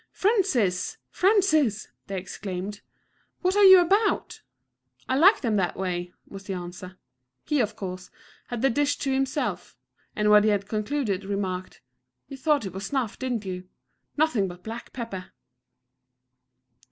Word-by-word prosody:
"Francis! 310 - +1
Francis!" 315 - +2 0.2
they 195 - -4
exclaimed, 190 +2 -6 0.6
"what 365 +2 +1
are 410 - +5
you 380 -1 +11
about?" 400 +5 +1 0.7
"I 260 - +1
like 380 +10 +6
them 225 -5 +1
that 180 -3 0
way," 180 -2 -3
was 195 0 -11
the 195 - -3
answer. 180 +1 -8 0.5
He, 300 - +1
of 215 -3 0
course, 185 -3 -6 0.4
had 240 0 -4
the 270 - +4
dish 290 +3 +1
to 270 -1 -1
himself, 270 +2 -2 0.4
and 210 0 +2
when 210 0 +8
he 215 - +3
had 200 -1 0
concluded, 215 -2 -2
remarked: 190 -2 -4 0.5
"You 275 - -8
thought 290 -3 +1
it 190 - -6
was 195 +1 -5
snuff, 255 -5 -2
did 245 -5 -2
you? 185 -1 -6 0.5
Nothing 290 -11 +2
but 180 0 -10
black 225 +3 -7
pepper." 215 -7 -7
215 Hz, 145 wpm, -26 LUFS, 190-285 Hz, 0.7 s, you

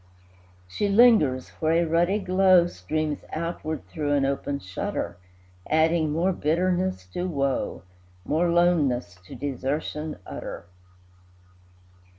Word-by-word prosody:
She 200 - -1
lingers 200 - +4
where 160 0 +2
a 170 +1 +3
ruddy 175 +5 +2
glow 185 -2 +4
Streams 155 - -3
outward 160 -1 -4
through 145 -2 -2
an 140 -1 +2
open 140 +1 -2
shutter, 90 -5 -4 0.5
Adding 160 0 +2
more 175 +5 +1
bitterness 180 - 0
to 180 - -2
woe, 140 - -2 0.4
More 165 +4 +1
loneness 145 - +2
to - - -9
desertion 145 +4 -3
utter. - - -7
155 Hz, 110 wpm, -25 LUFS, 140-175 Hz, 0.5 s, lingers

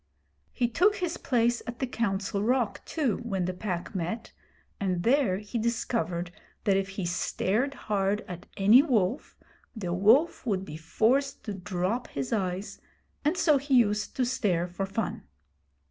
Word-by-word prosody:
He 245 - +1
took 360 - +3
his 355 -3 -2
place 240 -2 +1
at 235 0 -5
the 260 - -1
Council 200 -5 -1
Rock, 240 0 +1
too, 275 - 0
when 195 -6 -2
the 185 - -2
Pack 180 -1 -4
met, 190 +5 -3 0.5
and 185 -3 -1
there 240 -7 +3
he 210 +4 -4
discovered 185 -7 -1 0.3
that 200 -3 +3
if 195 0 0
he 190 - -1
stared 210 +9 0
hard 205 -2 -1
at 175 -1 -8
any 210 +6 +7
wolf, 245 - 0 0.4
the 180 -6 -3
wolf 225 - +4
would 195 -5 -1
be 150 - -8
forced 245 - +1
to 210 - -4
drop 190 +4 -2
his 135 - -4
eyes, 190 -1 -2 0.4
and 305 +5 +1
so 305 -6 +4
he 275 0 +1
used 210 -3 +2
to 255 - +1
stare 190 -9 0
for 185 +2 -4
fun. 200 +1 -3
210 Hz, 160 wpm, -28 LUFS, 185-245 Hz, 0.5 s, any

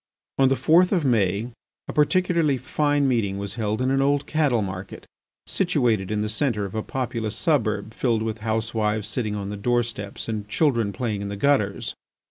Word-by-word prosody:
On 135 -1 +5
the 135 - +3
fourth 165 +8 +4
of 175 -7 +1
May 110 -1 +1 0.4
a - - -5
particularly 165 -2 +2
fine 145 +2 +1
meeting 110 -6 0
was 100 0 -4
held 110 +1 -1
in 130 - +1
an 135 0 +2
old 140 +1 +2
cattle 145 -8 +1
market, 95 0 -7 0.4
situated 125 - +1
in 105 0 0
the - - -1
centre 110 -2 0
of 95 - -7
a 110 - -1
populous 115 -3 -3
suburb 115 -9 0
filled 115 -3 0
with 110 -1 -3
housewives 110 -1 -1
sitting 110 -5 -2
on 100 -1 -4
the 105 - -5
doorsteps 115 -2 -2
and 105 -2 -4
children 115 -7 +1
playing 105 0 -3
in 100 - -4
the 100 - -4
gutters. 105 -6 +1
115 Hz, 180 wpm, -24 LUFS, 105-135 Hz, 0.4 s, On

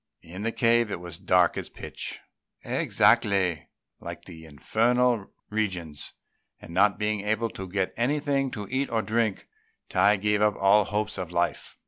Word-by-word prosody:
In 90 +4 -9
the 115 +2 -1
cave 115 -1 +3
it 95 - -4
was 85 -1 -8
as - - -25
dark 90 -2 +3
as - - -5
pitch, - - -7 0.5
exactly 95 -6 +2 0.3
like 85 0 -8
the 80 -3 -11
Infernal 115 - +1 0.2
Regions; 90 -8 -3 0.5
and 85 - -11
not 100 +2 +3
being 105 -1 -1
able 110 +2 -1
to 95 -1 -7
get 95 0 -1
anything 140 +2 0
to 105 -4 -6
eat 135 +1 0
or 115 -1 0
drink, 110 -1 -1 0.4
Tai 100 +3 +4
gave 105 +1 +1
up 105 -1 +3
all 100 +1 +4
hopes 105 +1 -2
of 90 -2 -5
life. 85 0 -2
105 Hz, 160 wpm, -26 LUFS, 90-115 Hz, 0.5 s, Tai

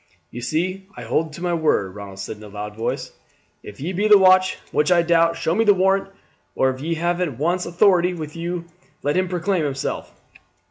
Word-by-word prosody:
"You 120 - -7
see 185 +9 -2
I - - -7
hold 160 0 -1
to 170 - -8
my 175 -1 0
word," 150 - +1
Ronald 100 -1 -9
said 100 +2 -6
in 105 - -14
a - - -9
loud 105 +1 -7
voice. 115 +1 -3 0.5
"If 100 - -11
ye 165 +7 -3
be 205 +4 +1
the 210 -1 +8
watch, 185 -1 +5
which 150 +4 +1
I 170 -1 +5
doubt, 165 0 +3
show 165 - 0
me 220 +5 +2
the 205 -2 +5
warrant, 195 +1 +2 0.5
or 130 - +2
if 130 0 -8
ye 165 +3 -1
have 175 +2 -1 0.2
one 170 +6 +1
in - - -4
authority 180 0 +3
with 155 -2 -7
you 170 +1 -4 0.4
let 145 +1 0
him 185 0 +1
proclaim 180 0 0
himself." 135 -2 -3
170 Hz, 215 wpm, -22 LUFS, 145-185 Hz, 0.5 s, the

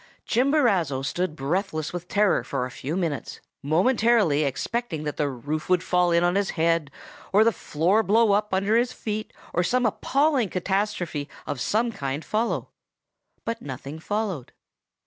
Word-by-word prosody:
"Chimborazo 225 - +2
stood 175 +2 -2
breathless 155 +1 -2
with 175 0 -5
terror 205 0 +2
for 135 -3 -2
a 130 - -7
few 145 +8 -4
minutes, 165 -7 -3 0.2
momentarily 190 - +3
expecting 160 - -2
that 150 -1 -4
the 145 -1 +1
roof 145 +6 -4
would 180 -1 +3
fall 180 -1 +2
in 170 0 +3
on 175 0 +3
his 200 0 +1
head, 165 -2 +2 0.4
or 205 +3 +6
the 230 - +4
floor 180 +4 +1
blow 220 +1 +4
up 210 +1 +1
under 195 +3 +2
his 245 +2 +2
feet, 215 0 -4 0.2
or 175 - +2
some 245 +7 +1
appalling 270 +1 +2
catastrophe 185 -5 -2 0.2
of 145 -4 -4
some 230 - +1
kind 140 -4 -4
follow; 225 +2 -1 0.8
but 230 0 -3
nothing 140 +2 -7
followed. 200 - -3
180 Hz, 155 wpm, -25 LUFS, 155-215 Hz, 0.8 s, or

